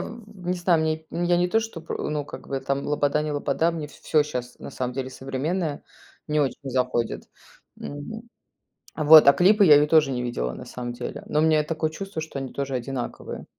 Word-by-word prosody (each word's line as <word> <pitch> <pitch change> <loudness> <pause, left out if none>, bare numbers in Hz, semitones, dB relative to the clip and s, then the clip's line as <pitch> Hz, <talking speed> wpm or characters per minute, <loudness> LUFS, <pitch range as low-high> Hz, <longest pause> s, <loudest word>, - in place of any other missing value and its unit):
в 210 -5 -10
не 180 - +2
знаю, 175 -2 +2
мне 160 0 -1
я 175 0 +1
не 180 +1 +2
то 225 +4 +2
что 220 -7 -6
про, 165 - -4
ну, 150 -1 -2
как - - -10
бы 135 - -2
там, 140 0 -2
Лобода 150 0 +1
не 150 -1 -3
Лобода, 145 +3 +1
мне 160 -3 -5
в - - -17
всё 155 -1 +1
сейчас 125 -4 -6
на - - -8
самом 125 -1 -4
деле 130 -1 -4
современное 145 +5 -3 0.5
не 150 0 +2
очень 140 0 -1
заходит. 125 -2 -1 0.5
Мгм. 180 +11 -7 0.7
А, 155 - -2
вот. 155 -1 +9
А 140 - +9
клипы 200 +8 +5
я 150 -3 +9
ее 145 +1 +5
тоже 155 -3 +4
не 125 -1 -2
видела 60 - -2
на - - -9
самом 120 -1 -6
деле, 120 - -6
но 150 - 0
у - - +4
меня 155 -1 +4
такое 155 0 -2
чувство, 195 0 -6
что 155 -3 -6
они 135 -1 -6
тоже 140 -1 -3
одинаковые. 125 0 -5
150 Hz, 215 wpm, -25 LUFS, 135-165 Hz, 0.7 s, вот